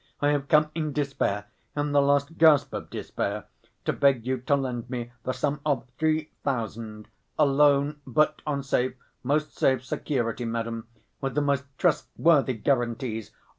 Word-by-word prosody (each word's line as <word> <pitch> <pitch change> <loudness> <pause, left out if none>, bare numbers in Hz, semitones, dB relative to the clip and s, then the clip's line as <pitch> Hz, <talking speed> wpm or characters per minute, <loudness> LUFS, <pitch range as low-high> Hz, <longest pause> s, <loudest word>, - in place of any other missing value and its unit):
"I 145 - +2
have 145 -2 0
come 150 0 +4
in 155 -3 -2
despair... 135 -8 -1 0.3
in 145 0 -1
the 145 0 +5
last 140 +3 +1
gasp 155 -3 +5
of - - -5
despair, - - -3 0.4
to - - +1
beg 135 -5 +3
you 130 0 -1
to 135 +4 +2
lend 125 -3 -3
me 120 -2 -4
the 130 - -2
sum 145 +2 -1
of 140 -5 0
three 155 -1 +1
thousand, 110 -4 -3 0.3
a 150 - +5
loan, 145 +1 +3
but 150 +5 +2
on 140 -2 -1
safe, 130 -1 0 0.3
most 150 +4 0
safe 130 -1 +2
security, 120 -3 -2
madam, 115 0 -3 0.3
with 135 -2 -2
the 150 - +3
most 140 -1 +1
trustworthy 155 -5 +2
guarantees! 120 -2 -1
140 Hz, 160 wpm, -26 LUFS, 120-145 Hz, 0.4 s, the